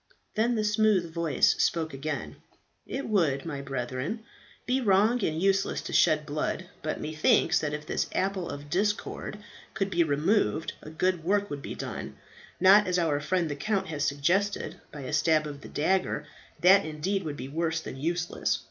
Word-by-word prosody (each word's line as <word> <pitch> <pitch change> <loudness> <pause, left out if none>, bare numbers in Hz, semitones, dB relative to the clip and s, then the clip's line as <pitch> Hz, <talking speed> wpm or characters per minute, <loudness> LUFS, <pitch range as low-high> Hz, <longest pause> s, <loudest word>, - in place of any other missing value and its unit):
Then 235 +2 +1
the 215 - 0
smooth 210 -5 +2
voice 165 -5 +3
spoke 160 -3 0
again. 145 +2 -4 0.5
"It 275 - -4
would, 165 -10 +1
my 145 -4 -4
brethren, 135 - -4 0.4
be 260 +2 +1
wrong 215 +2 +3
and 160 -2 0
useless 195 +1 +1
to - - -7
shed 155 -1 +4
blood; 150 +4 -2 0.2
but 155 - -3
methinks, 155 +2 +2
that 150 -1 -2
if 150 0 -8
this - - -1
apple 190 -2 -1
of 145 +1 -7
discord 205 +5 -1 0.4
could 195 0 -1
be 170 -1 +3
removed, 155 - +1
a - - -9
good 175 +1 0
work 205 +3 +1
would 145 -1 -4
be - - -6
done; - - -6 0.4
not, 195 +3 +7
as 180 0 +1
our 160 -4 +1
friend 170 +3 0
the 145 - -3
count 195 +6 -1
has 150 -3 -2
suggested, 170 +9 0
by 150 - -8
a 135 - -5
stab 155 0 +3
of 145 -1 -7
the - - -10
dagger; 185 +5 0 0.4
that 190 +3 +7
indeed 160 +6 -2
would 150 -3 -5
be 130 - -6
worse 160 +3 -1
than 160 - -7
useless. 170 +4 -1
165 Hz, 175 wpm, -28 LUFS, 150-195 Hz, 0.5 s, not